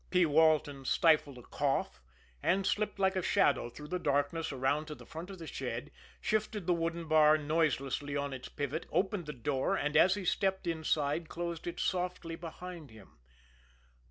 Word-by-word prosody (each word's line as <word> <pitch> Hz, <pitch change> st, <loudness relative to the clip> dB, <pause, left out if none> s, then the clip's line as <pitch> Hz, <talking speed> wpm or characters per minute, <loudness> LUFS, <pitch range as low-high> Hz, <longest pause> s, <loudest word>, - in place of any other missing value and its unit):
P. 180 Hz, -1 st, +4 dB
Walton 150 Hz, -3 st, +3 dB
stifled 150 Hz, -1 st, +3 dB
a 125 Hz, -, -11 dB
cough, 135 Hz, -, -1 dB, 0.4 s
and 190 Hz, +2 st, +2 dB
slipped 210 Hz, +1 st, 0 dB
like 190 Hz, -1 st, +2 dB
a 185 Hz, -, +1 dB
shadow 120 Hz, -, +2 dB
through 150 Hz, +5 st, -10 dB
the 180 Hz, -, -1 dB
darkness 145 Hz, +2 st, 0 dB
around 135 Hz, +3 st, 0 dB
to 150 Hz, -, -6 dB
the -, -, -14 dB
front 165 Hz, +4 st, -8 dB
of 195 Hz, -, -8 dB
the 165 Hz, -, -8 dB
shed, 135 Hz, -1 st, -5 dB, 0.3 s
shifted 215 Hz, -2 st, -1 dB
the 180 Hz, -, +3 dB
wooden 165 Hz, 0 st, -2 dB
bar 155 Hz, -1 st, +6 dB
noiselessly 145 Hz, -2 st, 0 dB
on 140 Hz, -1 st, -2 dB
its 130 Hz, -, -7 dB
pivot, 145 Hz, +3 st, -4 dB
opened 190 Hz, -3 st, 0 dB
the -, -, -3 dB
door, 135 Hz, 0 st, -1 dB
and, 150 Hz, +1 st, -1 dB
as 190 Hz, +1 st, +6 dB
he 200 Hz, -2 st, -5 dB
stepped 190 Hz, +1 st, 0 dB
inside, 160 Hz, -1 st, 0 dB
closed 170 Hz, -1 st, -4 dB
it 175 Hz, -, -4 dB
softly 180 Hz, -2 st, -2 dB
behind 170 Hz, -1 st, -8 dB
him. 110 Hz, -, -16 dB
160 Hz, 175 wpm, -32 LUFS, 145-175 Hz, 0.4 s, bar